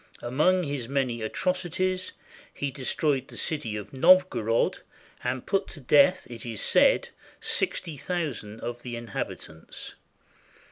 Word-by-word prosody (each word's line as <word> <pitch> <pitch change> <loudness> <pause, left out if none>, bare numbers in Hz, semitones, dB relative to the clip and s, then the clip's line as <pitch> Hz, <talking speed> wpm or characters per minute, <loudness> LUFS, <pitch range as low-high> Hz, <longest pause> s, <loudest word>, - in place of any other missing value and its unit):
Among 155 +10 +3
his 140 -6 -3
many 130 -4 0
atrocities, 185 +7 -1 0.4
he 140 -1 -3
destroyed 135 +1 0
the - - -11
city 130 -9 -2
of 105 +3 -7
Novgorod, 135 -7 +4 0.4
and 130 - -2
put 195 0 0
to 155 - -10
death, 150 +7 +5
it 120 -2 -8
is 115 -4 -5
said, - - +4 0.3
sixty 160 -4 -1
thousand 140 - -4
of 120 0 -5
the 120 -1 -5
inhabitants. 110 -8 -6
135 Hz, 125 wpm, -27 LUFS, 120-175 Hz, 0.4 s, death